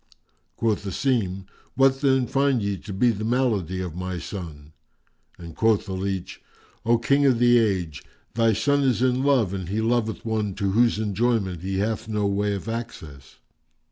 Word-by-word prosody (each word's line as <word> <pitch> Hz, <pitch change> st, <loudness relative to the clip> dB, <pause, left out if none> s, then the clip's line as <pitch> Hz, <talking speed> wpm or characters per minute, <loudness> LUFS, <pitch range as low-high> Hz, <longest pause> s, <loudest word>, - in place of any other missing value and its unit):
Quoth 110 Hz, -3 st, 0 dB
Asim, 100 Hz, -3 st, -1 dB, 0.3 s
"What 135 Hz, 0 st, +3 dB
then 135 Hz, -3 st, +3 dB
find 135 Hz, 0 st, +1 dB
ye 100 Hz, 0 st, -1 dB
to 100 Hz, -, -10 dB
be 120 Hz, +5 st, +2 dB
the 110 Hz, -1 st, -5 dB
malady 110 Hz, -7 st, 0 dB
of 90 Hz, -4 st, -5 dB
my 90 Hz, 0 st, -4 dB
son?"; 80 Hz, -5 st, -8 dB, 0.6 s
and 85 Hz, -2 st, -10 dB
quoth 110 Hz, -2 st, +2 dB
the 95 Hz, -, -5 dB
leach, 95 Hz, -1 st, -4 dB, 0.5 s
"O 120 Hz, 0 st, +5 dB
King 140 Hz, +4 st, +2 dB
of 130 Hz, -3 st, +3 dB
the 120 Hz, 0 st, +5 dB
Age, 90 Hz, -, -1 dB, 0.3 s
thy 115 Hz, -1 st, +3 dB
son 140 Hz, +7 st, +1 dB
is 125 Hz, -4 st, +1 dB
in 130 Hz, 0 st, +2 dB
love 130 Hz, -9 st, +2 dB
and 95 Hz, -3 st, -5 dB
he 105 Hz, +3 st, -1 dB
loveth 115 Hz, -1 st, -1 dB
one 105 Hz, -3 st, -1 dB
to 100 Hz, -2 st, -1 dB
whose 115 Hz, +2 st, +3 dB
enjoyment 105 Hz, -4 st, 0 dB
he 95 Hz, +1 st, -3 dB
hath 110 Hz, +3 st, -2 dB
no 105 Hz, -2 st, -1 dB
way 100 Hz, +1 st, 0 dB
of 100 Hz, -, -7 dB
access." 80 Hz, -, -7 dB
110 Hz, 175 wpm, -24 LUFS, 95-120 Hz, 0.6 s, O